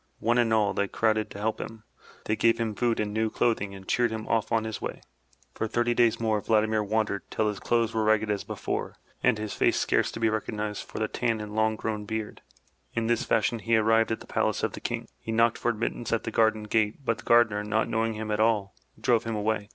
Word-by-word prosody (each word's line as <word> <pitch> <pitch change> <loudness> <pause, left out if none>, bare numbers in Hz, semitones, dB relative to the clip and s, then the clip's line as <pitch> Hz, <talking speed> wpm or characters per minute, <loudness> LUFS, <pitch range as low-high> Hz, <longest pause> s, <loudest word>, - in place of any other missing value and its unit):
One 120 +2 +2
and 115 -2 +2
all, 105 -2 +3
they 100 - 0
crowded 110 0 +1
to 100 - -9
help 110 +1 -1
him. 110 -1 -8 0.4
They 110 - +1
gave 115 +1 +3
him 115 -2 -1
food 115 +2 0
and 105 -1 -1
new 110 0 +1
clothing 105 -4 0
and 95 -1 -12
cheeredhim 110 -3 0
off 115 -1 0
on 115 -1 +2
his 110 -1 -5
way. - - -5 0.5
For 110 - -2
thirty 120 +2 +1
days 115 -1 +3
more^ 110 -3 0
Vladimir 110 -1 +2
wandered, 105 -1 0
till 110 -1 0
his 105 - -4
clothes 115 -1 +1
were 110 -1 +1
ragged 110 0 +2
as 100 - -1
before - - -4 0.3
and - - +3
his 105 -1 -4
face - - +2
scarce - - +1
to - - -6
be 115 - +3
recognized 105 -1 -3
for - - -8
the 110 - 0
tan 115 -1 -1
and 105 0 -6
long 110 0 +2
grown 105 -1 -3
beard. 110 0 -4 0.5
In 115 - 0
this 115 0 +1
fashion 115 +1 +1
he 115 +1 +2
arrived 115 +1 +3
at 110 - -2
the - - -10
palace' - - 0
of - - 0
the - - -8
King. - - -3
He 115 - -6
knocked 115 +1 +3
for 120 - 0
admittance 120 +1 -2
at 115 - +1
the 115 - -4
garden 110 -1 +2
gate, 110 +4 0
but 115 -2 0
the - - -11
gardener, 110 -3 +4
not 110 +1 0
knowing 115 0 0
him 110 0 -4
at 105 - 0
all, 110 -3 +2 0.3
drove 120 -2 +2
him 115 -1 -2
away. 105 0 -1
110 Hz, 235 wpm, -27 LUFS, 105-115 Hz, 0.5 s, gardener